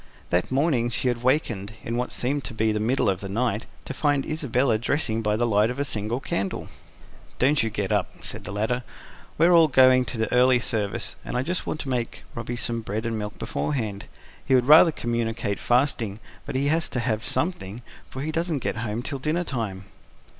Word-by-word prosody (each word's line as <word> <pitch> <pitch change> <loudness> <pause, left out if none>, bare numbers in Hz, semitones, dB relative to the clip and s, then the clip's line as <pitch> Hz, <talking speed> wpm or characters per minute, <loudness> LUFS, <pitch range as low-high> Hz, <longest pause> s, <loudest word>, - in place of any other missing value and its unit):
That 90 +6 +1
morning 130 -4 +2
she 120 +2 0
had 120 -1 -2
wakened, 115 -6 0
in 115 - -3
what 125 +1 -2
seemed 140 +3 -1
to 120 - -6
be 110 0 +2
the 105 - -1
middle 120 +3 +1
of 95 -2 +1
the 100 - -5
night, 110 +1 -1 0.2
to - - -5
find 145 -1 +1
Isabella 130 -6 +1
dressing 115 -3 0
by 105 -1 +1
the 120 +2 +1
light 105 -1 +3
of 125 - -4
a 140 - 0
single 110 0 -2
candle. 100 -7 -3 0.7
"Don't 140 +3 +3
you 115 - 0
get 100 -3 -3
up," - - +1 0.2
said - - -6
the - - -6
latter. 110 +5 -1 0.6
"We're 170 +2 +5
all 165 -2 +7
going 130 -2 +5
to 110 -1 -2
early 125 0 +5
service, 105 -4 -2
and - - -3
I 125 - +1
just 180 +5 -3
want 155 - -2
to 140 - -6
make 120 -3 -2
Robby 115 +1 -4
some 115 -1 -2
bread 110 +1 -4
and 115 -1 -1
milk 105 0 -5
beforehand. 110 -8 -3 0.4
He 135 - +3
would 125 -1 +3
rather 155 +4 +8
communicate 115 -5 -2
fasting, 120 -5 +1 0.3
but - - -4
he 140 +2 +1
has 160 +1 +1
to 125 - -2
have 115 -2 -1
something, 120 - -2 0.3
for 130 - -5
he 155 - -2
doesn't 165 -4 -1
get - - -1
home 110 +1 -3
till 140 0 -4
dinner 155 +6 0
time." 110 - -4
120 Hz, 205 wpm, -25 LUFS, 110-135 Hz, 0.7 s, rather